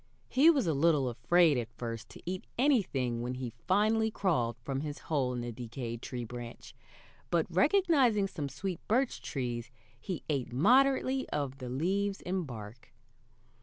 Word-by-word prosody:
He 285 +5 +6
was 285 -7 +3
a 160 - +1
little 145 -3 +3
afraid 160 +3 +3
at 115 -1 -5
first 115 -2 -5
to - - -13
eat 185 +1 -4
anything 175 - +1
when 125 +1 -3
he 125 -3 -5
finally 215 +3 +3
crawled 140 - 0
from 135 0 -2
his 150 -1 -5 0.2
hole 135 -4 +2
in 125 -1 -3
the 120 0 -4
decayed 120 0 -6
tree 125 -2 -5
branch; 120 0 -9 0.6
but, 170 -2 +2
recognizing 260 - +4
some 150 -7 -5
sweet 180 +6 -4
birch 250 +4 +1
trees, 120 -3 -4 0.3
he 180 +5 -5
ate 135 -5 -1
moderately 260 - +3
of 140 -2 -3
the 125 -2 -6
leaves 195 +9 0
and 180 -2 -2
bark. 115 0 -9
150 Hz, 160 wpm, -31 LUFS, 125-200 Hz, 0.6 s, He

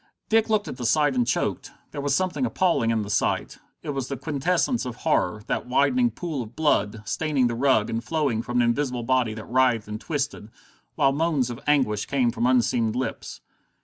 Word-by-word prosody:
Dick 225 0 +3
looked 215 -1 +1
at - - -6
the 120 - -5
sight 150 0 +3
and 125 -2 +1
choked. - - -1 0.2
There 145 - -5
was 140 -1 +1
something 185 +6 -1
appalling 180 - +1
in 115 -2 +1
the 100 - -7
sight: - - -1 0.2
it 150 - -3
was 135 -2 -3
the 140 - -4
quintessence 165 - 0
of 125 -2 -5
horror, 110 - 0
that - - -2
widening 190 - +3
pool 165 - -4
of 115 0 -9
blood, 110 -8 +1
staining 145 +3 0
the 120 - 0
rug, 115 -3 +2
and 115 +1 -3
flowing 145 -8 0
from 120 +1 -3
an - - +2
invisible 125 0 -1
body 125 -3 +1
that 110 - -8
writhed 125 -3 +2
and 105 +1 -6
twisted, 145 -8 -3 0.5
while 135 - +3
moans 145 -4 0
of 120 - -7
anguish 130 -8 +2
came 130 -4 +1
from 120 +1 0
unseen 120 -3 +2
lips. 130 +1 -4
130 Hz, 200 wpm, -25 LUFS, 115-150 Hz, 0.5 s, Dick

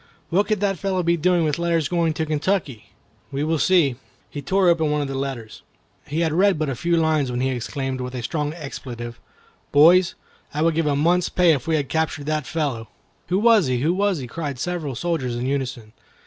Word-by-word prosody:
What 200 +4 +2
could 215 -2 0
that 195 -4 0
fellow 190 -2 -1
be 170 +1 +2
doing 175 +1 +2
with 155 0 0
letters 170 -3 +1
going 170 -2 +1
to 160 - -1
Kentucky? 155 - -2 0.4
We 140 +1 -2
will 160 0 0
see." 160 -9 +3 0.3
He 145 - -5
tore 190 +6 +2
open 165 -3 +3
one 150 0 +1
of 145 - -2
the 135 - -5
letters. 135 -5 -5 0.5
He 155 +4 -1
had 160 -2 +1
read 190 +1 +3
but 155 -2 -1
a 135 - -2
few 170 +6 0
lines 155 -4 +1
when 125 0 -2
he 130 +1 +1
exclaimed, 130 +1 -3
with 125 0 -5
a 125 - -4
strong 150 +2 -2
expletive, 120 -7 -7 0.5
"Boys, 170 +5 +6 0.4
I 150 - +1
would 165 0 +3
give 160 -1 0
a 145 - +2
month's 170 +5 +2
pay 180 -2 +4
if 135 -1 -3
we 160 - +2
had 145 -3 -1
captured 160 -2 -1
that 155 -3 -2
fellow!" 140 -8 -2 0.4
"Who 180 - +1
was 220 - +4
he? 125 -1 0
Who 160 +5 +2
was 200 -1 +1
he?" 135 - -5
cried 140 +1 -5
several 155 -2 -3
soldiers 135 -4 -2
in 120 +1 -3
unison. 130 -5 -3
155 Hz, 220 wpm, -22 LUFS, 135-170 Hz, 0.5 s, Boys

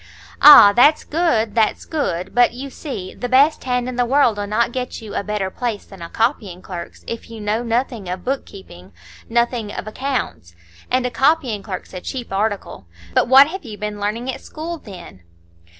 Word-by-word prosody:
"Ah! 210 -9 +10
that's 290 +6 +5
good, 290 -10 0
that's 220 -2 +1
good. 185 - -3
But, 245 -1 +4
you 270 +2 -7
see, 205 - -7
the 245 - -5
best 275 +4 +3
hand 250 -1 -1
in 255 -1 -5
the 245 - +3
world'll 235 -6 +2
not 225 +3 0
get 250 0 -4
you 220 -3 -9
a - - -2
better 205 -2 -3
place 230 -3 -4
than 195 -3 -14
a 170 - -7
copying 215 -7 -2
clerk's, 175 -3 -8
if 230 - -7
you 225 -1 -9
know 210 +2 -1
nothing 235 -4 -2
of 180 0 -5
book 270 +2 -1
keeping,—nothing 195 - -5
of - - -6
accounts. 215 - -4 0.3
And 255 0 +1
a 250 - -1
copying 265 -6 +1
clerk's 190 -3 -7
a 180 - -6
cheap 245 -3 -6
article. 200 - -3 0.3
But - - +2
what 265 +2 +8
have 380 +2 -7
you 220 -5 -9
been 210 0 -5
learning 225 +5 -2
at - - -9
school, 330 +2 -7
then?" 180 - -12
230 Hz, 185 wpm, -20 LUFS, 200-255 Hz, 0.3 s, Ah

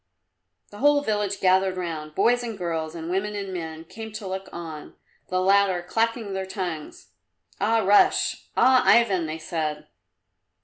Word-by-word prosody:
The 205 - -11
whole 290 +1 +4
village 205 -4 -1
gathered 185 0 +3
round 155 -4 -5
boys 245 +1 +3
and 230 -3 -5
girls 165 -3 -3
and 165 -1 -6
women 205 +3 -1
and 195 -2 -5
men 160 -2 -6
came 220 +5 -9
to 210 - -7
look 190 0 -5
on, 160 -3 -8 0.3
the 185 - 0
latter 190 -1 +3
clacking 225 +1 -1
their 190 0 -3
tongues. 175 - -6 0.5
"Ah, 220 +2 +2
Russ! 205 +2 +3
Ah, 260 0 +6
Ivan!" 195 -8 +4
they 155 +1 -4
said. 155 -2 -3
190 Hz, 150 wpm, -25 LUFS, 165-210 Hz, 0.5 s, Ah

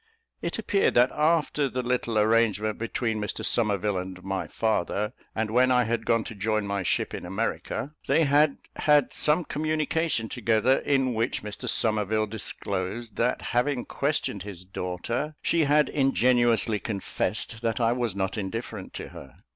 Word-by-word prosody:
It - - -3
appeared 200 -2 +1
that 125 +2 +5
after 150 -2 +1
the 125 0 -3
little 120 -2 0
arrangement 110 -1 +2
between 115 -1 -1
Mr 105 - -3
Somerville 105 -3 +1
and 90 0 -7
my 95 0 -3
father, 105 0 -1 0.2
and 110 -1 -1
when 125 +2 +4
I 125 -1 +4
had 115 +1 -2
gone 115 -1 +3
to - - -7
join 110 +1 -1
my 100 0 -1
ship 90 - 0
in - - -5
America, 115 +8 -3
they 155 +4 +4
had 145 0 +3 0.2
had 150 -3 +3
some 155 +3 +2
communication 155 -4 -1
together, 115 +2 +2
in 135 -3 +1
which 115 0 -1
Mr 105 +4 -4
Somerville 110 -1 +1
disclosed, 105 0 -3
that 125 +2 0
having 125 +1 +1
questioned 140 -8 -1
his 95 -2 -7
daughter, 95 - -3
she 165 -2 +2
had 150 +1 +4
ingenuously 120 -5 +2
confessed 110 +2 -3
that 115 0 -1
I 115 -1 +3
was 120 -5 -1
not 95 +1 -2
indifferent 105 0 -5
to - - -6
her. 65 -2 -13
115 Hz, 155 wpm, -26 LUFS, 105-130 Hz, 0.2 s, that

